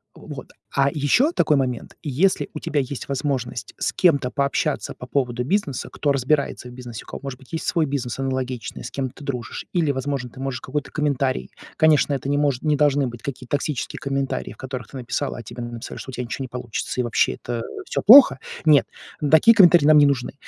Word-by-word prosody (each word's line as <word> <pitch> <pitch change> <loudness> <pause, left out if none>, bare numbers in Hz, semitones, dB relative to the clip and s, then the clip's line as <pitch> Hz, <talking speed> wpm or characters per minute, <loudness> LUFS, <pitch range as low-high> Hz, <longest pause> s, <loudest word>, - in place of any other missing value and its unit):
Вот. - - -10 0.2
А 140 0 +4
ещё 160 - +2
такой 150 - +2
момент, 125 -3 -2
если 165 +6 +1
у 155 - -5
тебя 150 - -1
есть 135 0 -4
возможность 135 -4 -3
с - - -1
кем-то 140 -8 +3
пообщаться 140 +2 -1
по 125 - -10
поводу 125 -3 -1
бизнеса, 150 -2 -1
кто 145 - 0
разбирается 140 -1 0
в - - -12
бизнесе, 125 -2 -8
у - - -27
кого, - - -8
может 135 -2 -6
быть, 135 - -19
есть 165 - -3
свой 165 -2 +1
бизнес 135 -3 -3
аналогичный, 130 -3 -3
с - - -7
кем 135 -2 -3
ты 135 - -14
дружишь, 125 -5 -5
или, 165 -5 +2
возможно, 135 -2 -3
ты 130 - -14
можешь 135 -2 -4
какой-то 145 +2 -4
комментарий. 140 -3 -1 0.3
Конечно, 155 -2 +4
это 135 0 -3
не 145 - +1
может, 145 -4 +1
не 150 -1 +2
должны 145 -2 +2
быть, 120 -2 -8
какие-то 125 -3 -7
токсические 145 -2 -3
комментарии, 135 -1 -2
в - - -21
которых 130 -4 -6
ты 135 - -9
написала, 130 +3 -3
а - - -8
тебе 120 +2 -8
написали, 120 -1 -7
что 130 - -8
у - - -14
тя 125 - -4
ничего 125 +2 -4
не - - -5
получится, 125 0 -4
и - - -1
вообще 120 -2 +1
это, 120 -1 -5
э, 115 - -7
всё - - -2
плохо. 230 - +9 0.3
Нет, 150 -3 +6 0.5
такие 225 +9 +7
комментарии 175 -6 +7
нам 155 0 +7
не 145 - +7
нужны. 140 -3 0
135 Hz, 215 wpm, -22 LUFS, 125-145 Hz, 0.5 s, плохо